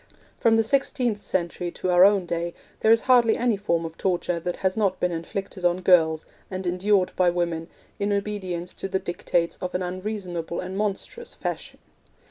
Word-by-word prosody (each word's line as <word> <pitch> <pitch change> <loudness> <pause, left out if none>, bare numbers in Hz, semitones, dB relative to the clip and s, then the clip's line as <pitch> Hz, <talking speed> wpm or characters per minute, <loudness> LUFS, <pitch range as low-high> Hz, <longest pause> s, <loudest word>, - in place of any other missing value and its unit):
From 230 -1 +4
the 225 - +4
sixteenth 240 -3 0
century 175 -1 -2
to 185 - -2
our 175 0 +7
own 200 -2 +5
day 170 0 -3 0.2
there 220 - +4
is 230 - +6
hardly 240 -3 +4
any 240 -2 +2
form 170 -4 -1
of 160 0 -8
torture 175 -2 0
that 175 +1 -3
has 190 -1 0
not 200 -4 +1
been 180 - +1
inflicted 185 +3 -5
on 175 +1 +2
girls, 160 -4 +4 0.2
and 185 0 -5
endured 185 +1 +2
by 180 -1 +4
women, 170 -2 -1 0.3
in 200 0 0
obedience 190 -4 -3
to - - -5
the 190 - +1
dictates 175 -2 -1
of 180 -1 -4
an 180 - 0
unreasonable 180 -3 -4
and 185 +1 -5
monstrous 215 - -3
Fashion. - - -5
185 Hz, 180 wpm, -25 LUFS, 175-205 Hz, 0.3 s, our